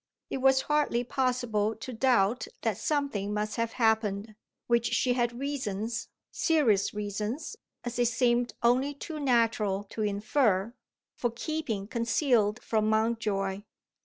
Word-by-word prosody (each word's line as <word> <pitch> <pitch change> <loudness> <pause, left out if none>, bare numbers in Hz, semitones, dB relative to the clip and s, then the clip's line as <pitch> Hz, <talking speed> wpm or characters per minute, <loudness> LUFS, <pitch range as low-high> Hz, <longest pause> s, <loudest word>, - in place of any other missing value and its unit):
It - - -1
was 265 0 +4
hardly 295 -5 +1
possible 245 -5 0
to 250 +4 -7
doubt 235 -2 +2 0.2
that 220 -5 0
something 250 -9 -1
must 210 +2 -2
have 230 0 -1
happened, 220 -2 +1 0.3
which 235 -1 +2
she 250 - +2
had 240 -1 0
reasons 230 -5 -3 0.2
serious 260 - +2
reasons, 210 - -4 0.3
as 240 0 -4
it 240 - +4
seemed 240 0 +1
only 260 +4 +3
too 310 +2 -6
natural 230 -7 +2
to 220 - -4
infer 210 0 +1 0.4
for 240 - -1
keeping 235 -4 -3
concealed 230 -2 +1
from 215 -1 +1
Mountjoy. 215 -3 0
230 Hz, 130 wpm, -29 LUFS, 210-255 Hz, 0.4 s, was